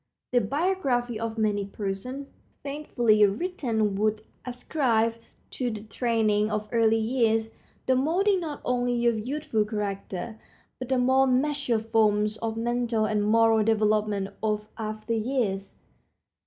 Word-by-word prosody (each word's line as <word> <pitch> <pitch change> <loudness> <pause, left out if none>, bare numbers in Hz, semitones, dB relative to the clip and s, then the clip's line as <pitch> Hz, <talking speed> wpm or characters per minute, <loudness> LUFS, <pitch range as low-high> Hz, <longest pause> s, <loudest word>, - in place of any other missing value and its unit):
The 245 -1 +3
biography 255 - 0
of 225 0 -4
many 210 -2 +1
persons, 200 +7 -5 0.4
faithfully 245 -7 +2
written, 225 - -1
would 215 +1 0 0.2
ascribe 245 -3 0 0.4
to 250 -2 -2
the 215 -2 -6
training 215 -1 +1
of 210 0 -2
early 225 -1 +3
years 225 -1 +1 0.3
the 260 - +3
molding 365 +9 +2
not 310 -4 -5
only 245 -1 0
of 235 -2 +2
youthful 290 -6 0
character, 210 0 -4 0.4
but 255 -1 -6
the 260 - +2
more 260 +2 +4
matured 255 -4 +1
forms 215 -1 +2
of 225 0 -3
mental 235 -1 0
and 210 -1 0
moral 225 +1 +4
development 210 -2 +1
of 210 -1 -1
after 215 0 -4
years. 220 -5 -1
225 Hz, 130 wpm, -26 LUFS, 215-250 Hz, 0.4 s, more